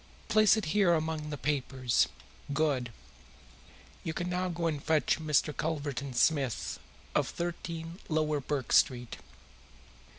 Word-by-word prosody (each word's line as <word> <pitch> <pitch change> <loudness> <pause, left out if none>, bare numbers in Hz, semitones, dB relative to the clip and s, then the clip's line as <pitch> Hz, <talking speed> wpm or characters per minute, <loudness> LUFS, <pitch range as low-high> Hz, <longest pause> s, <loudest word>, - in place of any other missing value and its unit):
Place 215 0 +5
it 215 - -1
here 195 -5 +4
among 155 -1 -2
the 145 - -4
papers. 130 -4 +1 0.5
Good! 140 -5 +1 1.1
You 160 - -3
can 175 +2 -3
now 180 +1 0
go 170 -1 -2
and 150 -4 -1
fetch 155 -1 +2
Mr. 155 -1 +2
Culverton 140 -4 -3
Smith, 135 -3 +1 0.3
of - - +2
13 170 0 -5
Lower 155 -2 +1
Burke 140 -1 -3
Street." 120 -2 +3
155 Hz, 125 wpm, -31 LUFS, 140-170 Hz, 1.1 s, Place